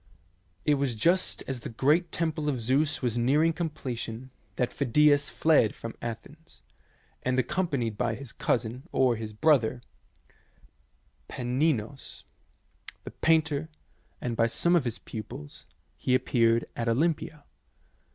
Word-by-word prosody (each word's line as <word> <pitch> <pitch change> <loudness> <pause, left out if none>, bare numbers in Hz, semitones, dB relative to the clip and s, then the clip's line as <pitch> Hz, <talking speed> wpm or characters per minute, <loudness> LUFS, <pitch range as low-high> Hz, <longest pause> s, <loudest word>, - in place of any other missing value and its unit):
It 145 -2 +3
was 130 -4 0
just 170 - +1
as 135 -2 -3
the - - -7
great 150 +9 +2
temple 155 -2 -1
of 130 -4 -1
Zeus 140 +6 +1
was 120 -1 0
near 135 +6 +3
ing 165 0 +3
completion 130 -7 -5 0.2
that 125 0 -1
Phidias 145 +1 +3
fled 155 -9 +3
from 115 - -7
Athens, 130 +8 -8 0.6
and, 130 0 0
accompanied 130 - -1
by 115 -2 0
his 125 +1 -9
cousin, 125 +6 -2
or 130 -2 +3
his 110 -1 -6
brother, 120 0 +2 1.5
Paneinos, 130 0 -2 0.8
the - - -8
painter, 160 -1 +1 0.5
and 120 -2 -3
by 115 0 +3
some 170 +9 +2
of 160 -6 +2
his 120 - -2
pupils, 100 -10 -9 0.3
he 125 - +1
appeared 115 -2 +2
at 115 0 -1
Olympia. 150 +3 0
130 Hz, 130 wpm, -28 LUFS, 115-150 Hz, 1.5 s, It